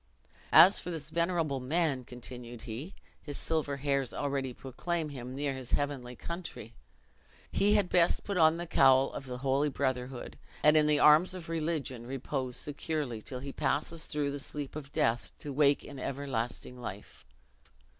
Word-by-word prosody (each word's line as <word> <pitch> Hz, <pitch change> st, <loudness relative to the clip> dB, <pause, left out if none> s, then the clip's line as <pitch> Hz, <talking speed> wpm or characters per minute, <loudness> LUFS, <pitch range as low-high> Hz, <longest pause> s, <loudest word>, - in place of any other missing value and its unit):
"As 195 Hz, -, +8 dB
for -, -, -5 dB
this 160 Hz, -3 st, -5 dB
venerable 170 Hz, -5 st, 0 dB
man," 140 Hz, 0 st, 0 dB
continued 120 Hz, -1 st, -8 dB
he, 125 Hz, -, -7 dB, 0.3 s
"his 145 Hz, -2 st, -6 dB
silver 150 Hz, -3 st, -1 dB
hairs 140 Hz, -2 st, -1 dB
already 140 Hz, -2 st, -1 dB
proclaim 155 Hz, +6 st, -3 dB
him 130 Hz, -2 st, -7 dB
near 140 Hz, 0 st, -1 dB
his 130 Hz, -2 st, -7 dB
heavenly 135 Hz, -4 st, -1 dB
country! 170 Hz, -, -7 dB, 0.8 s
He 205 Hz, +1 st, +3 dB
had 205 Hz, -3 st, +3 dB
best 175 Hz, -1 st, +3 dB
put 200 Hz, -, -3 dB
on 160 Hz, -1 st, +5 dB
the 175 Hz, -, -4 dB
cowl 135 Hz, -4 st, +5 dB
of 135 Hz, -, -6 dB
the 125 Hz, -1 st, -4 dB
holy 135 Hz, +3 st, +1 dB
brotherhood, 130 Hz, -2 st, -3 dB, 0.2 s
and, 150 Hz, +1 st, +6 dB
in 155 Hz, -1 st, +5 dB
the 150 Hz, -1 st, +3 dB
arms 155 Hz, +6 st, +6 dB
of 170 Hz, -3 st, -8 dB
religion, 155 Hz, -7 st, -2 dB
repose 130 Hz, -1 st, -3 dB
securely, 145 Hz, -5 st, -2 dB
till 125 Hz, +3 st, -6 dB
he 140 Hz, 0 st, -6 dB
passes 160 Hz, +2 st, -1 dB
through 145 Hz, -2 st, -1 dB
the 140 Hz, -, -4 dB
sleep 145 Hz, 0 st, -3 dB
of 140 Hz, -2 st, -7 dB
death 115 Hz, -3 st, 0 dB
to 145 Hz, -, -6 dB
wake 140 Hz, 0 st, +3 dB
in 140 Hz, -2 st, -9 dB
everlasting 125 Hz, -2 st, -3 dB
life!" 95 Hz, -, -8 dB
140 Hz, 165 wpm, -31 LUFS, 130-155 Hz, 0.8 s, As